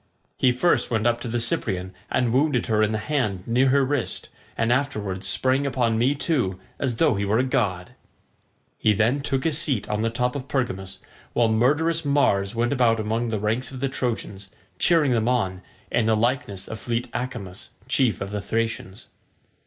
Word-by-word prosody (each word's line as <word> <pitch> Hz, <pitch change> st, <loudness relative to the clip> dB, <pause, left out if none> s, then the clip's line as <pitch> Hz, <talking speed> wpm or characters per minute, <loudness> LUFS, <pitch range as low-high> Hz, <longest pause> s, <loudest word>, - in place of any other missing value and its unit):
He 130 Hz, -, +3 dB
first 170 Hz, +8 st, +2 dB
went 110 Hz, -1 st, 0 dB
up 120 Hz, 0 st, +2 dB
to -, -, -4 dB
the 120 Hz, +1 st, -1 dB
Cyprian 95 Hz, -5 st, -1 dB, 0.2 s
and 120 Hz, -2 st, +1 dB
wounded 135 Hz, -2 st, +2 dB
her 110 Hz, -1 st, +1 dB
in 110 Hz, 0 st, +2 dB
the 110 Hz, -, 0 dB
hand 105 Hz, -6 st, -1 dB
near 125 Hz, +3 st, +3 dB
her 140 Hz, +1 st, +4 dB
wrist, 140 Hz, -2 st, -2 dB, 0.3 s
and 115 Hz, +2 st, +2 dB
afterwards 105 Hz, -8 st, -2 dB
sprang 130 Hz, +7 st, +1 dB
upon 120 Hz, -4 st, +1 dB
me 130 Hz, +5 st, +3 dB
too, 125 Hz, -, 0 dB, 0.2 s
as 130 Hz, -4 st, 0 dB
though 155 Hz, +4 st, +3 dB
he 100 Hz, -1 st, -1 dB
were 100 Hz, +2 st, +1 dB
a 125 Hz, -, +3 dB
god." 100 Hz, -9 st, -1 dB, 0.9 s
He 105 Hz, -, +3 dB
then 115 Hz, +7 st, +2 dB
took 135 Hz, -2 st, -1 dB
his 160 Hz, -2 st, +1 dB
seat 140 Hz, -10 st, 0 dB
on 105 Hz, 0 st, -1 dB
the 115 Hz, -, +1 dB
top 125 Hz, +3 st, -1 dB
of 140 Hz, -1 st, -5 dB
Pergamus, 95 Hz, -9 st, -3 dB, 0.3 s
while 115 Hz, -2 st, +3 dB
murderous 150 Hz, +9 st, +2 dB
Mars 115 Hz, -8 st, +2 dB
went 120 Hz, +3 st, +1 dB
about 120 Hz, -4 st, +3 dB
among 110 Hz, +2 st, -1 dB
the 110 Hz, -, -1 dB
ranks 110 Hz, +5 st, -1 dB
of 130 Hz, -, -8 dB
the 135 Hz, +1 st, -1 dB
Trojans, 110 Hz, -6 st, -4 dB, 0.3 s
cheering 160 Hz, -6 st, +4 dB
them 115 Hz, -2 st, +1 dB
on, 95 Hz, -7 st, 0 dB, 0.3 s
in 110 Hz, -, +2 dB
the 110 Hz, -1 st, +3 dB
likeness 110 Hz, -5 st, -1 dB
of 110 Hz, -, -6 dB
fleet 120 Hz, 0 st, -2 dB
Acamas 120 Hz, -7 st, -5 dB, 0.2 s
chief 130 Hz, -3 st, +1 dB
of 100 Hz, 0 st, -4 dB
the 105 Hz, -1 st, -3 dB
Thracians. 110 Hz, -2 st, -3 dB
120 Hz, 190 wpm, -24 LUFS, 105-130 Hz, 0.9 s, her